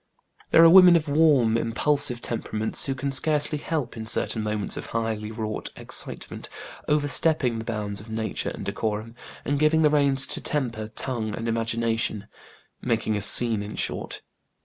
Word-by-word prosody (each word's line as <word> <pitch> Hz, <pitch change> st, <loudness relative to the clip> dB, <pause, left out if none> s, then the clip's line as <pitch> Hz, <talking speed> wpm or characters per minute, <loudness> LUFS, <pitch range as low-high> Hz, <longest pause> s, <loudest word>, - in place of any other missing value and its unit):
There 165 Hz, -, +6 dB
are 165 Hz, -, +8 dB
women 180 Hz, -1 st, +8 dB
of 160 Hz, -2 st, 0 dB
warm, 140 Hz, -7 st, +3 dB
impulsive 125 Hz, +2 st, 0 dB
temperaments 110 Hz, -2 st, -2 dB
who 135 Hz, -, -2 dB
can 140 Hz, +1 st, -3 dB
scarcely 150 Hz, +1 st, +1 dB
help, 150 Hz, -6 st, -4 dB
in 110 Hz, -1 st, -7 dB
certain 110 Hz, -, +1 dB
moments 105 Hz, -1 st, -3 dB
of -, -, -7 dB
highly 110 Hz, -2 st, -3 dB
wrought 110 Hz, -1 st, -4 dB
excitement, -, -, -6 dB, 0.4 s
over 150 Hz, -1 st, +1 dB
stepping 145 Hz, -6 st, +2 dB
the 110 Hz, -, -7 dB
bounds 105 Hz, -3 st, -4 dB
of 110 Hz, -, -14 dB
nature 110 Hz, -1 st, -3 dB
and -, -, -8 dB
decorum, 110 Hz, +1 st, -4 dB, 0.3 s
and 145 Hz, 0 st, -1 dB
giving 155 Hz, +1 st, +3 dB
the 150 Hz, -, +4 dB
reins 140 Hz, -2 st, +4 dB
to -, -, -5 dB
temper, 120 Hz, -7 st, -3 dB
tongue, 110 Hz, -5 st, -2 dB
and 115 Hz, -, -5 dB
imagination 115 Hz, -2 st, -1 dB, 0.6 s
making 110 Hz, -3 st, -1 dB
a 105 Hz, -, -2 dB
scene, 110 Hz, +1 st, +4 dB
in 105 Hz, +1 st, -7 dB
short. -, -, -4 dB
115 Hz, 165 wpm, -24 LUFS, 110-145 Hz, 0.6 s, are